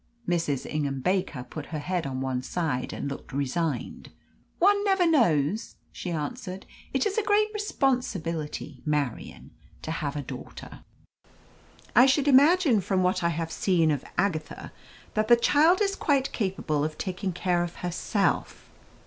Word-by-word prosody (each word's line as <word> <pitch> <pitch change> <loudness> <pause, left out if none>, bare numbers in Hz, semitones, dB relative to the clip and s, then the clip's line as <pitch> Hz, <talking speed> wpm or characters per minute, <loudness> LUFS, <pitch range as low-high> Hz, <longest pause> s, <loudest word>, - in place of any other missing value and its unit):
Mrs. 165 -6 0
Ingham 140 -3 -2
Baker 180 -6 -1
put 145 +4 -8
her 160 - -4
head 175 0 -2
on 130 -1 -4
one 130 -1 -1
side 145 -2 -2
and - - -4
looked 140 - -7
resigned. 140 0 -2 0.5
"One 405 +3 +4
never 385 -3 +3
knows," 215 - +2 0.2
she 180 - -6
answered. 185 +4 -4 0.3
"It - - +1
is 415 +1 +1
a - - -1
great 420 +1 +3
responsibility, 175 - -2
Marian, 150 -5 -3 0.3
to 155 - -4
have 150 -3 -3
a 145 - -3
daughter." - - -9 1.2
"I 245 +4 +8
should 275 +1 +2
imagine, 285 - +5
from 190 0 0
what 185 0 +1
I 170 - +3
have 165 0 -3
seen 165 -5 +2
of 145 -3 -2
Agatha, 175 -5 -2 0.4
that 215 0 +1
the 240 - +8
child 310 - +4
is 395 -1 0
quite 275 -3 +1
capable 185 -8 -1
of 155 0 -3
taking 185 0 -3
care 175 0 0
of 175 0 -6
herself." 195 +4 -1
180 Hz, 150 wpm, -27 LUFS, 150-255 Hz, 1.2 s, I